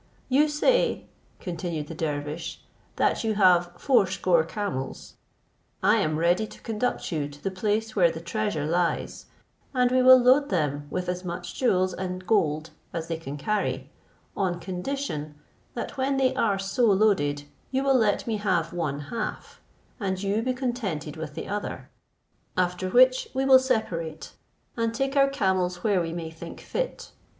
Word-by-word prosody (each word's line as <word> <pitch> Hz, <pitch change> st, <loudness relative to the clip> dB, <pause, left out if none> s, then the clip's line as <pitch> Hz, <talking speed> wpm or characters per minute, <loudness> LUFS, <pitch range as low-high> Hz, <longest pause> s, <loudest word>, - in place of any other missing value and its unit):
"You 285 Hz, +4 st, +4 dB
say," 305 Hz, +12 st, +2 dB, 0.3 s
continued 170 Hz, -4 st, -4 dB
the 165 Hz, -, -8 dB
dervish, 155 Hz, +1 st, -4 dB, 0.3 s
"that -, -, +1 dB
you 220 Hz, -1 st, 0 dB
have 180 Hz, -3 st, +4 dB
fourscore 185 Hz, -, +3 dB
camels: 165 Hz, -7 st, -5 dB, 0.7 s
I -, -, +5 dB
am 155 Hz, 0 st, 0 dB
ready 175 Hz, +6 st, +2 dB
to -, -, -13 dB
conduct 225 Hz, 0 st, -2 dB
you 150 Hz, -3 st, -1 dB
to 145 Hz, 0 st, -15 dB
the 195 Hz, -, -1 dB
place 215 Hz, +3 st, -1 dB
where 180 Hz, -4 st, +5 dB
the 160 Hz, -, -5 dB
treasure 170 Hz, -2 st, -2 dB
lies, 170 Hz, +2 st, -1 dB, 0.5 s
and 250 Hz, -1 st, +3 dB
we 255 Hz, 0 st, +4 dB
will 255 Hz, 0 st, +9 dB
load 255 Hz, +3 st, +4 dB
them 145 Hz, -5 st, -1 dB
with 180 Hz, -, -3 dB
as 180 Hz, 0 st, -3 dB
much 175 Hz, 0 st, -5 dB
jewels 185 Hz, -7 st, +1 dB
and 185 Hz, 0 st, -5 dB
gold 160 Hz, -7 st, +1 dB, 0.2 s
as 165 Hz, -1 st, -5 dB
they 165 Hz, -, -1 dB
can 145 Hz, -3 st, -7 dB
carry, 140 Hz, -7 st, -2 dB, 0.4 s
on 180 Hz, -3 st, -1 dB
condition 180 Hz, -, -4 dB, 0.4 s
that -, -, -5 dB
when 270 Hz, +1 st, +1 dB
they 265 Hz, -1 st, +3 dB
are 205 Hz, -3 st, +1 dB
so 195 Hz, +5 st, 0 dB
loaded 190 Hz, -9 st, +2 dB, 0.3 s
you 265 Hz, +1 st, 0 dB
will 275 Hz, 0 st, +3 dB
let 220 Hz, -5 st, +2 dB
me 225 Hz, -2 st, -1 dB
have 180 Hz, -5 st, 0 dB
one 150 Hz, -5 st, -2 dB
half, 215 Hz, +10 st, -5 dB, 0.4 s
and 190 Hz, -2 st, -2 dB
you 200 Hz, +2 st, +1 dB
be 255 Hz, +2 st, 0 dB
contented 220 Hz, -, -3 dB
with 160 Hz, -2 st, -7 dB
the -, -, -5 dB
other; 205 Hz, +1 st, -5 dB, 0.7 s
after 180 Hz, 0 st, 0 dB
which 255 Hz, +4 st, +5 dB
we 265 Hz, +1 st, +1 dB
will 265 Hz, -1 st, +8 dB
separate, 185 Hz, -, -2 dB, 0.4 s
and 230 Hz, -1 st, -1 dB
take 270 Hz, +2 st, -1 dB
our 275 Hz, -1 st, +5 dB
camels 185 Hz, -8 st, 0 dB
where 200 Hz, -4 st, +2 dB
we 165 Hz, -1 st, -3 dB
may 165 Hz, -1 st, -5 dB
think 160 Hz, -, -9 dB
fit. -, -, -4 dB
185 Hz, 160 wpm, -26 LUFS, 165-230 Hz, 0.7 s, will